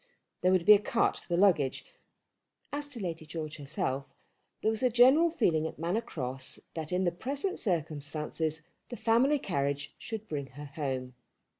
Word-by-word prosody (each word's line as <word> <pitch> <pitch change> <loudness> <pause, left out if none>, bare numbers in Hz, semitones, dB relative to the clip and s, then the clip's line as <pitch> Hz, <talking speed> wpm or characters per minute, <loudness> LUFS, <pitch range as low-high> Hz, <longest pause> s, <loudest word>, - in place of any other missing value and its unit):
There 185 - +4
would 185 -2 +3
be 210 - +10
a 205 - +6
cart 230 +3 +1
for - - -19
the 175 - 0
luggage. 160 -10 +3 0.9
As 290 0 -3
to 265 -5 -7
Lady 170 -5 -4
George 155 0 -6
herself 140 -2 -3 0.5
there 220 - +3
was 220 - -2
a 255 - +4
general 260 +8 +6
feeling 165 - +1
at - - -8
Manor 175 +8 0
Cross 130 - -4
that 160 -1 -4
in 180 +1 +1
the 175 - +2
present 280 - -3
circumstances 155 -2 -2 0.3
the 240 - -6
family 250 +6 +3
carriage 140 - -2
should 220 -1 -6
bring 140 -3 -3
her 140 +3 -9
home. 135 -3 -4
165 Hz, 170 wpm, -30 LUFS, 145-225 Hz, 0.9 s, be